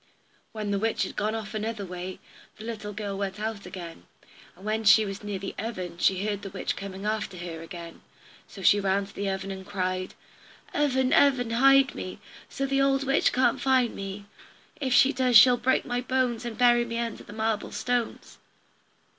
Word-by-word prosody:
When 210 -2 -4
the 200 - +1
witch 225 +2 0
had - - -5
gone 215 +1 -1
off 220 -1 -6
another 215 -1 -3
way, 180 0 -6 0.4
the 215 - -10
little 220 -2 -5
girl 205 -1 -4
went 195 0 -4
on 220 0 -2
again, 170 - -9 0.5
and 190 - -14
when 220 +1 -1
she 215 +1 +6
was 195 +1 -6
near 205 -1 -3
the 195 +1 -6
oven 185 -6 -5
she 190 +2 +2
heard 205 -2 -2
the 195 - -6
witch 190 0 -3
coming 195 0 -7
after 215 -3 -2
her 170 -2 -6
again, 170 0 -9 0.5
so 195 - -11
she 205 - +6
ran 195 0 +1
to 195 - -15
the 200 0 -2
oven 195 0 -3
and 190 0 -7
cried: 185 -1 -3 0.6
"Oven, 265 -3 +2
oven, 260 -5 +4
hide 270 +3 +5
me, - - -6 0.3
So 275 - -2
the 275 0 +1
old 275 0 +2
witch 270 0 +2
can't 255 - +2
find 260 -3 +3
me; 195 +1 -6 0.5
If 270 -3 -2
she 275 +2 +5
does 250 -2 +5
she'll 245 +3 +8
break 260 +2 +1
my 245 0 -1
bones, 250 -2 0
And 235 -2 -5
bury 240 -1 +5
me 230 -1 -4
under 235 -1 -3
the - - -12
marble 220 0 -2
stones." 240 +2 -3
215 Hz, 195 wpm, -27 LUFS, 195-245 Hz, 0.6 s, she'll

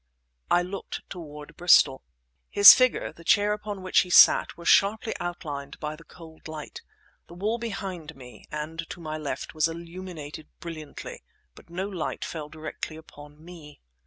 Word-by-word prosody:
I 175 - +3
looked 195 +2 -7
toward 150 -4 -9
Bristol. 170 -6 +5 0.5
His 200 0 +11
figure, 255 -1 +1
the 165 - -15
chair 205 +3 +3
upon 205 -2 -6
which 185 - +3
he 180 - 0
sat, - - +6
were 170 - -11
sharply 215 +5 +3
outlined 150 -5 -6
by 150 0 -4
the 165 - -16
cold 160 0 -14
light. 155 -1 -8 0.5
The 170 - -13
wall 215 +6 -2
behind 190 -8 -6
me, 125 -2 -14
and 155 +2 -5
to - - -8
my 155 -2 -5
left, 145 -2 -5
was 155 0 +2
illuminated 165 -2 -8
brilliantly; 155 -3 -8 0.3
but - - -18
no 185 +3 -4
light 185 -6 -4
fell 155 -3 -6
directly 155 0 -7
upon 150 0 -15
me. 160 -5 -13
165 Hz, 160 wpm, -26 LUFS, 150-185 Hz, 0.5 s, His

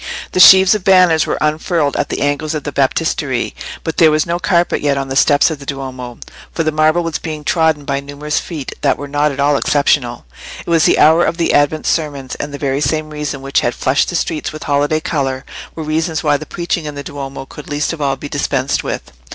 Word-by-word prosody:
The - - -1
sheaves 190 +1 +8
of 210 -3 -2
banners 180 -4 +4
were - - -1
unfurled 155 -1 0
at - - -1
the - - -2
angles 145 +2 -1
of 150 - -4
the 145 - -4
Baptistery, 140 -1 -1 0.3
but 160 - -4
there 160 - +6
was 155 0 +1
no 170 +1 -2
carpet 175 -1 +1
yet 145 -1 +1
on 135 -1 -3
the 135 - -3
steps 145 +3 +4
of 155 - -5
the 140 - -11
Duomo, 130 -3 -6 0.3
for 165 - -2
the 155 - 0
marble 155 +3 +2
was 165 -2 -3
being 155 -2 -6
trodden 160 -2 +1
by 140 0 -1
numerous 145 +2 -3
feet 155 -6 -6
that - - +2
were 145 - -7
not 145 +1 +1
at 140 - -8
all 145 0 +3
exceptional. 135 - +1 0.4
It - - -8
was 165 -2 +4
the - - +4
hour 160 +3 +5
of 170 - -1
the 170 - +1
Advent 145 +2 +2
sermons, 145 -5 -2
and 145 - -5
the 140 - -6
very 140 0 -1
same 155 +2 -1
reasons 150 -2 -5
which 135 0 +1
had 120 - -1
flushed 130 +2 +1
the 175 - -4
streets 160 -2 -2
with 155 0 -8
holiday 145 +2 0
colour 135 -4 -2 0.3
were 160 - -5
reasons 160 +1 -1
why 150 -2 +3
the 155 +2 -5
preaching 170 -1 -3
in 150 -1 -6
the 140 - -6
Duomo 135 -1 -7
could 145 +2 -12
least 145 +2 -1
of 160 - -7
all 135 -1 +1
be 140 +2 -8
dispensed 140 -1 -1
with. - - -5
150 Hz, 235 wpm, -16 LUFS, 140-160 Hz, 0.4 s, sheaves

